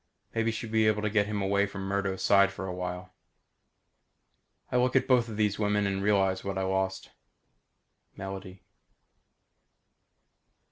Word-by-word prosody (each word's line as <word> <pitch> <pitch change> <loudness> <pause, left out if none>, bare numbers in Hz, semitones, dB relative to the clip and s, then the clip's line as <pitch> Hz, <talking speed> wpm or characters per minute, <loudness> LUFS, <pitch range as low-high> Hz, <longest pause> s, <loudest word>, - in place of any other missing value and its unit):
Maybe 115 0 +1
she'll 110 0 -4
be 110 -1 +3
able 105 0 +1
to 105 - 0
get 105 -1 +2
him 105 -2 -2
away 100 +1 +2
from 95 0 -7
Murdo's 95 -1 -2
side 100 -1 +5
for 95 -1 -6
a 95 - -4
while. 90 0 -5 1.6
I 125 - +2
look 125 +1 +2
at - - +3
both 125 -3 +4
these 105 -2 -1
women 105 -1 +1
and 95 -1 -1
realize 95 -2 +2
what 100 -1 -3
I 95 - 0
lost. 95 0 -2 1.1
Melody. 95 -1 -7
100 Hz, 145 wpm, -29 LUFS, 95-105 Hz, 1.6 s, side